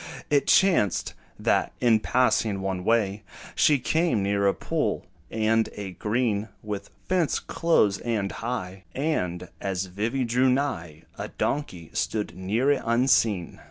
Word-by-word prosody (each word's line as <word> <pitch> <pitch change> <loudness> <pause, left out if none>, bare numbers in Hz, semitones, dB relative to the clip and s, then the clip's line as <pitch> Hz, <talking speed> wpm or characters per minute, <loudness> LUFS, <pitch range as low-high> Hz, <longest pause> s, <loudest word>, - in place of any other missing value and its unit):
It 145 -2 +3
chanced, 170 - +3 0.2
that, - - +1
in 115 -3 +4
passing 110 -4 +1
one 95 -1 -2
way, 105 -2 +1 0.3
She 150 - +4
came 155 - +1
near 100 0 +1
a 100 - +3
pool, - - -2 0.2
and 110 0 +1
a 100 -2 -6
green 110 +1 -1
With 105 -2 -5 0.2
fence 180 -4 +1
close 110 -12 +1
and 110 -5 -1
high; 95 -6 -5
And, 90 - -2
as 95 -1 -2
Vivy 110 +8 -2
drew 125 +2 +2
nigh, 125 - -2 0.2
A - - -3
donkey 90 - -3
stood 105 -5 -2
near 110 +9 +1
it 140 - +1
unseen. 115 -6 +2
110 Hz, 135 wpm, -26 LUFS, 95-130 Hz, 0.3 s, in